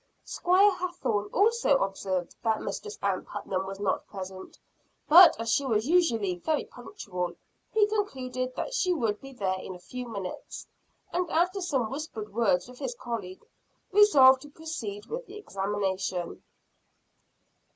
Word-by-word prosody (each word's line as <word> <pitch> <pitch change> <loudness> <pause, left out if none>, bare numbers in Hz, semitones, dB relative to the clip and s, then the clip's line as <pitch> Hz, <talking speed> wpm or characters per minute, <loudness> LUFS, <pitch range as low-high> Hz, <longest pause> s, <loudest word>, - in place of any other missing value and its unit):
Squire 380 +3 +4
Hathorne 230 - -2
also 435 -8 +3
observed 190 -4 -2
that 220 -2 +1
Mistress 425 0 -5
Ann - - 0
Putnam 190 0 -4
was 195 0 -7
not 200 -2 -1
present; 190 -1 -8 0.5
but, 340 -1 +9
as 230 0 -1
she 280 - +2
was 225 -3 0
usually 230 - +2
very 310 - 0
punctual, 180 - -6 0.4
he 435 -2 +4
concluded 260 -12 -3
that - - -4
she 370 -7 +2
would 220 -7 -1
be 270 - -10
there 190 -7 -2
in 185 - -7
a - - -11
few 250 +7 -7
minutes, 200 -5 -6 0.5
and 360 -1 0
after 365 +4 +1
some 265 -10 -1
whispered 265 -8 -6
words 210 -5 +2
with 250 0 -13
his 260 -4 -4
colleague, 215 -7 -6 0.5
resolved 280 -11 +7
to 290 - -11
proceed 285 -10 -6
with 485 +1 -6
the 410 - -10
examination. 195 - -3
245 Hz, 145 wpm, -28 LUFS, -, 0.5 s, but